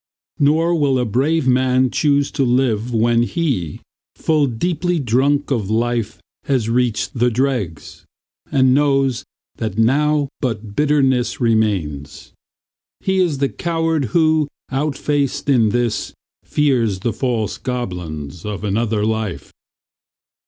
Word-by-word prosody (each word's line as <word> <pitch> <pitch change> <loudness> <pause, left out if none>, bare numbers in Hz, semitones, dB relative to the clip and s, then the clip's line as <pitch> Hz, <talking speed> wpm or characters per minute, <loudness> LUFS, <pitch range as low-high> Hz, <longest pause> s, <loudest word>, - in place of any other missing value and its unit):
Nor 160 +4 +3
will 145 -5 +2
a 125 - 0
brave 135 +7 +1
man 130 0 +3
choose 145 -2 +1
to 140 - 0
live 125 -2 +1
when 115 +1 +2
he, 120 - -2 0.3
Full 155 -3 +1
deeply 175 +8 -1
drunk 140 +2 +1
of 110 -7 -1
life, 115 0 -1 0.3
has 130 -6 0
reached 120 -2 0
the 120 0 +2
dregs, 115 - -2 0.5
And 130 -3 +4
knows 135 -3 +2 0.3
that 110 -3 -4
now 145 +5 +2
but 110 -5 -4
bitterness 135 -4 +1
remains. 100 - -1 0.7
He 190 0 0
is 170 -6 +1
the 140 0 0
coward 165 -3 -1
who, 155 +4 +2 0.2
outfaced 140 0 -1
in 120 -6 +4
this, 120 0 -1 0.3
Fears 120 -10 +1
the 115 - -1
false 110 -1 -2
goblins 90 - -5
of 105 -1 -5
another 105 +1 0
life. 110 -4 -3
125 Hz, 120 wpm, -19 LUFS, 110-145 Hz, 0.7 s, And